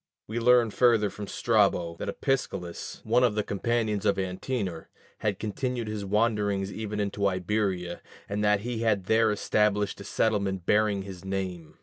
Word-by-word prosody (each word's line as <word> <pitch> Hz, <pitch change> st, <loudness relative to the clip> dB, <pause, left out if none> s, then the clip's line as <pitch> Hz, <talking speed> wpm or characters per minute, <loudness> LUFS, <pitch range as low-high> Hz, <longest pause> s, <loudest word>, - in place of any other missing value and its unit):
We 110 Hz, +2 st, -3 dB
learn 120 Hz, -1 st, +5 dB
further 115 Hz, -4 st, +3 dB
from 105 Hz, -1 st, -7 dB
Strabo 100 Hz, -8 st, +2 dB
that -, -, -5 dB
Opsicellas, 100 Hz, -, -3 dB
one 120 Hz, +3 st, +3 dB
of 120 Hz, -4 st, +3 dB
the 105 Hz, -, +1 dB
companions 105 Hz, 0 st, -1 dB
of 100 Hz, -2 st, +2 dB
Antenor, 95 Hz, -1 st, -3 dB, 0.3 s
had 105 Hz, -3 st, -1 dB
continued 120 Hz, +2 st, -3 dB
his 105 Hz, -1 st, -4 dB
wanderings 100 Hz, -1 st, +1 dB
even 105 Hz, -1 st, -4 dB
into 100 Hz, 0 st, 0 dB
Iberia, 95 Hz, -2 st, -1 dB, 0.3 s
and 105 Hz, +1 st, -2 dB
that 105 Hz, -1 st, +3 dB
he 120 Hz, +1 st, -3 dB
had 110 Hz, -4 st, +1 dB
there 110 Hz, +3 st, +3 dB
established 105 Hz, -1 st, +1 dB
a -, -, -7 dB
settlement 100 Hz, -3 st, 0 dB
bearing 105 Hz, -1 st, +2 dB
his 95 Hz, -2 st, -9 dB
name. 95 Hz, -5 st, -4 dB
105 Hz, 155 wpm, -28 LUFS, 95-110 Hz, 0.3 s, learn